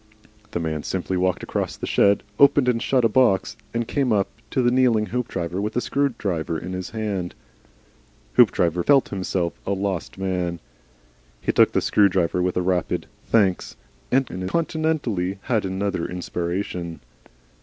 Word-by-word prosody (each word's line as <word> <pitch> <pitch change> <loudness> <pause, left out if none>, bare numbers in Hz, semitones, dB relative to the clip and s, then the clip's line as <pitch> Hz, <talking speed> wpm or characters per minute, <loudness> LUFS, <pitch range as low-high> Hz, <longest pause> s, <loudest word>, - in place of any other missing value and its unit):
The - - -3
man 80 -2 -2
simply 95 +2 -3
walked 90 0 0
across - - -3
the - - -4
shed, 100 0 +3 0.2
opened 140 -2 +6
and 120 -2 +2
shut 125 -2 +2
a - - +7
box, 110 -5 +2 0.2
and 115 -1 -2
came 135 -3 0
up 100 -2 +2 0.2
to 130 - 0
the 120 - +3
kneeling 125 -4 +3
Hoopdriver 95 -6 -2
with 105 +1 -3
a - - +3
screwdriver 105 - -1
in 90 +4 -6
his 95 -1 -4
hand. 100 -5 -3 1.0
Hoopdriver 85 +5 +4
felt 140 +4 +4
himself 95 -3 -2
a 100 - -1
lost 95 -3 -3
man. 90 -3 -2 0.8
He - - 0
took - - +4
the - - +2
screwdriver 90 -3 +2
with 90 0 0
a 90 - +1
tepid 90 -1 0 0.2
"Thanks," 100 -5 +2 0.4
and 130 0 +3
incontinently 115 - -1
had 115 -6 0
another 95 -2 -2
inspiration. 90 -1 -4
95 Hz, 150 wpm, -23 LUFS, 90-120 Hz, 1.0 s, a